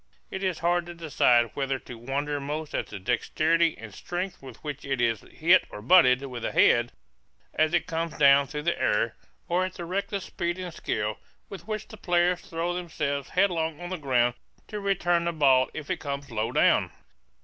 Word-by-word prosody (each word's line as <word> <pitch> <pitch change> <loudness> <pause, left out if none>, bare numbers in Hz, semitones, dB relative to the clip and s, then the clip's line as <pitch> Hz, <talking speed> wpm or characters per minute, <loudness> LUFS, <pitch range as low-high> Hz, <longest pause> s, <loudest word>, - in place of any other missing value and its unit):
It 190 - -4
is 185 -4 0
hard 175 0 +2
to 175 - -8
decide 125 -8 +3
whether 135 -1 -1
to 120 0 -10
wonder 140 +5 -3
most 150 +2 -5
at - - -2
the - - -7
dexterity 155 - +1
and 110 -2 -10
strength 180 - -5
with 130 -4 -11
which 150 -1 -5
it 135 -2 -2
is 115 -3 +1
hit 175 +4 +3
or - - -8
butted 125 - +5
with 125 -3 -7
the - - -2
head, 120 0 +4 0.6
as 155 +2 +2
it - - +1
comes 165 -1 -3
down 140 -1 +6
through 150 +2 -5
the 170 +1 -1
air, 105 +2 +1 0.3
or 175 +2 +1
at 185 0 -4
the 175 - -6
reckless 195 +2 -3
speed 175 -1 -3
and 180 -2 -6
skill 105 -7 -3 0.3
with 195 +1 -9
which 215 -1 -4
the 220 - -11
players 175 -1 +1
throw 170 +2 -3
themselves 150 -6 -3
headlong 165 -5 +1
on 175 +1 -7
the 185 - -2
ground 125 -4 +2 0.4
to 210 - -4
return 175 -4 +1
the 170 - +1
ball 135 -5 +4
if 155 -2 -6
it - - 0
comes 140 -1 -5
low 110 +1 -1
down. - - +3
155 Hz, 195 wpm, -27 LUFS, 130-175 Hz, 0.6 s, down